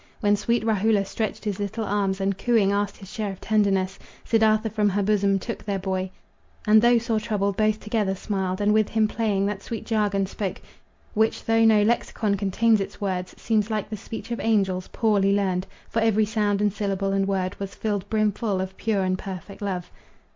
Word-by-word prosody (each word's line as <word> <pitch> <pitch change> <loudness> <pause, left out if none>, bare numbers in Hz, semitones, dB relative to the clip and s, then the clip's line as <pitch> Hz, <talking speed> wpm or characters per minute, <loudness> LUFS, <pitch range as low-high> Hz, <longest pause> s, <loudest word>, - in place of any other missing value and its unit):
When 205 -2 +3
sweet 225 +2 0
Rahula 215 -1 +2
stretched 220 +2 -4
his 205 -2 -2
little 215 +2 -3
arms, 195 -2 0
And 195 0 0
cooing 215 -1 +2
asked 200 0 -1
his 195 -1 -12
share 210 -3 -2
of 190 - -10
tenderness, 195 -3 +1 0.3
Siddartha 220 -1 +3
from 210 -1 +2
her 200 +1 0
bosom 200 -1 +2
took 225 +4 -6
their 200 -2 -2
boy, 190 0 -2 0.6
And 215 0 +6
though 240 +1 +5
sore 230 -1 0
troubled, 205 -2 -1
both 215 +1 +1
together 210 -3 -1
smiled, 190 -1 -2
And 205 +1 +3
with 215 -1 +3
him 220 -1 +2
playing, 210 -3 0
that 205 -1 -2
sweet 225 +1 -6
jargon 205 -3 +1
spoke, 195 0 -4 0.5
Which, 220 +1 +1
though 225 0 +3
no 215 -2 +5
lexicon 215 -1 0
contains 205 +2 +2
its 195 - -6
words, 185 -2 -3
Seems 215 -1 0
like 215 -1 -2
the - - -2
speech 225 +3 -8
of 235 - -2
angels, 195 -5 +1
poorly 200 -3 +2
learned, 185 -2 0 0.2
For 230 - -1
every 220 -1 +3
sound 210 -1 0
and 205 -2 +2
syllable 195 -1 -1
and 195 0 +1
word 190 -1 -1
Was 195 0 -5
filled 205 -2 -2
brimful 215 -2 0
of 190 0 -4
pure 210 -3 0
and 185 0 0
perfect 195 +1 -8
love. 185 -3 -3
205 Hz, 195 wpm, -24 LUFS, 195-220 Hz, 0.6 s, And